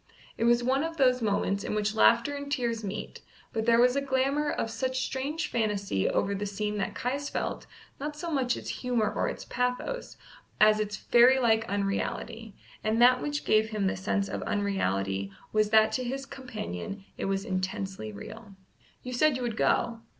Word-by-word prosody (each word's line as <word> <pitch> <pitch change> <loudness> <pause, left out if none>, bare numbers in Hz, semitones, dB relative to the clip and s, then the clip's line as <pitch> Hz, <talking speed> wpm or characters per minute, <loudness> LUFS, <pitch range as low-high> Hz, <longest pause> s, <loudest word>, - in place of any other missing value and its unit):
It 230 - -1
was 240 0 +4
one 265 +3 +2
of 325 0 -4
those 255 -3 +4
moments 200 -2 0
in - - -2
which 210 0 0
laughter 235 +4 +4
and 285 0 -6
tears 235 -4 -1
meet, 200 +1 -5 0.3
but 220 0 -2
there 230 0 +5
was 250 +1 +5
a 280 - +1
glamour 275 +2 +1
of 225 - -2
such 255 +3 -1
strange 285 +5 -3
fantasy 205 - 0
over 200 - 0
the 205 +1 -3
scene 210 +1 -2
that 195 - -2
Caius 275 +3 -2
felt, - - -3 0.3
not 295 +2 -4
so 335 +2 -5
much 260 -4 +1
its - - -7
humour 235 -4 0
or - - 0
its - - -7
pathos, 250 - -2 0.4
as 215 0 +6
its 210 -1 -2
fairy 245 +2 +5
like 225 -3 +2
unreality, 205 +2 -3 0.3
and 220 +1 +1
that 250 +1 +6
which 295 0 -3
gave 215 +1 +3
him 210 -3 -1
the 190 - +1
sense 200 +1 -1
of - - -4
unreality 100 - -1 0.2
was 215 -1 +3
that 220 0 +5
to 255 - -1
his 270 +2 -4
companion 215 - -6
it - - -4
was 195 +1 -1
intensely 185 - -3
real. 200 - -10 0.5
"You 250 - -5
said 285 +2 +3
you 255 - -4
would 235 -3 -2
go." 230 +1 +1
230 Hz, 185 wpm, -28 LUFS, 205-260 Hz, 0.5 s, as